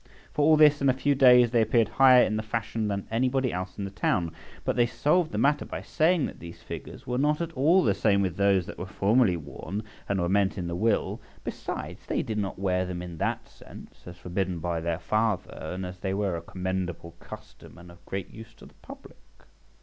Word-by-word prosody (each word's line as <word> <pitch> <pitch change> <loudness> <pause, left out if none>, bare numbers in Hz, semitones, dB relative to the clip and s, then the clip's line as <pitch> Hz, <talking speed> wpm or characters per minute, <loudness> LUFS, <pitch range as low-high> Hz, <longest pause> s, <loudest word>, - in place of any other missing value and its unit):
For 150 - 0
all 155 +1 +5
this, 150 -1 +6
in 140 - +3
a - - +4
few 140 +2 +1
days 125 -3 +6
they 120 -2 +3
appeared 110 0 +3
higher 130 +1 +6
in 110 - -1
the 110 - -1
fashion 110 0 -3
than 100 -1 -3
anybody 130 +2 +1
else 90 +1 -5
in 100 - -4
the 100 - -6
town. 85 -3 0 0.3
But - - 0
they 120 -1 +3
solved 150 +8 +1
the - - -4
matter 145 +1 +2
by - - -7
saying 160 -1 +2
that - - -8
these 85 0 -11
figures - - -8
were 125 +1 -2
not 150 +2 +2
at 170 -1 -3
all 165 +6 +3
the 105 - +3
same 100 0 +2
with 90 -3 -2
those 100 -2 +2
that - - -9
were 90 - -5
formerly 100 0 +2
worn 85 +6 -6 0.3
and 100 -1 0
were 85 - 0
meant 100 +1 +1
in 90 - -3
the 85 0 -3
will; 110 +4 0 0.2
besides, - - -6
they - - -1
did 110 -1 -3
not 100 -2 -3
wear 90 -1 0
them 90 -1 -5
in 85 -2 -8
that - - -2
sense, - - -15
as 90 0 -9
forbidden 90 0 -3
by 85 0 -2
their 85 0 -1
father, 105 -2 -2
but 95 -1 -4
as 90 0 -9
they 95 +1 -2
were 100 -3 -1
a 85 - -5
commendable 90 -1 -4
custom, - - -12
and 85 0 -13
of 85 0 -18
great 95 -2 -5
use 115 0 -12
to - - -15
the - - -16
public. - - -13
100 Hz, 225 wpm, -27 LUFS, 90-125 Hz, 0.3 s, this